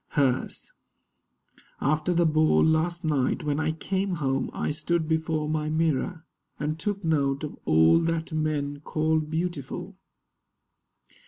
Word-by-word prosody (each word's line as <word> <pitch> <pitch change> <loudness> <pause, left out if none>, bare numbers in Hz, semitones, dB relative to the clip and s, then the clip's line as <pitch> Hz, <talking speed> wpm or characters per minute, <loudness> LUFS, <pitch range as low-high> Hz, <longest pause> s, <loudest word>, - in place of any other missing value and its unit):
HERS 135 -3 0 1.1
After 155 +5 +1
the 170 0 +3
ball 155 0 +4
last 165 +2 +1
night, 140 -5 +1
when 150 0 0
I 160 0 +1
came 190 +3 -2
home 135 -4 -1
I - - -2
stood 160 +1 -1
before 160 -1 0
my 155 0 -1
mirror, 160 +1 0 0.3
and 155 +2 -2
took 200 0 -2
note 140 -3 +1
Of 150 - -4
all 80 - +5
that 165 -1 -1
men 150 -2 -1
call 155 +2 0
beautiful. 160 -2 -4
155 Hz, 130 wpm, -26 LUFS, 150-165 Hz, 1.1 s, all